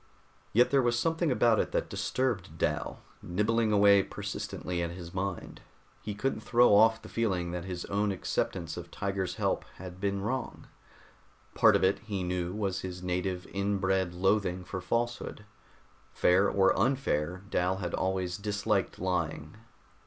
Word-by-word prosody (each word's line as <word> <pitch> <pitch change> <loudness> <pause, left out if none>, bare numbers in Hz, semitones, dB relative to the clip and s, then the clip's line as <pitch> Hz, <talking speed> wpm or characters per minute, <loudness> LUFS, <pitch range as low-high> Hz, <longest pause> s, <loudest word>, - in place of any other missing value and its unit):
Yet 120 +3 +4
there 140 -1 +5
was 120 -1 +1
something 165 +4 +1
about 120 -3 +3
it - - -1
that - - 0
disturbed 100 -11 -2
Dal, - - -2 0.2
nibbling 110 +5 +1
away 100 -1 +6
persistently 90 -2 -4
at 85 - -1
his 85 0 -9
mind. 95 -1 -4 0.4
He 105 -1 -5
couldn't 120 +3 -1
throw 120 +1 +4
off 110 +2 +6
the - - -9
feeling 95 -7 -1
that 90 0 -4
his 90 -2 -5
own 100 +1 0
acceptance 90 -3 -2
of 85 -1 -7
Tiger's 95 0 -3
help - - 0
had 90 0 -9
been 100 -1 0
wrong. 130 +6 -3 0.9
Part - - +5
of - - +2
it, 95 +1 +3
he 100 -4 -4
knew, 90 -1 -2
was 100 -2 -2
his 90 -1 -6
native, 90 0 -2
inbred 95 -2 0
loathing 95 -1 +1
for 95 +1 -5
falsehood. 115 -1 -2 0.7
Fair 95 +3 +3
or 95 -1 +3
unfair, 95 - 0
Dal 90 +1 +1
had 90 -3 -4
always 95 -1 -1
disliked 100 0 -1
lying. 85 -4 -2
95 Hz, 150 wpm, -30 LUFS, 90-105 Hz, 0.9 s, away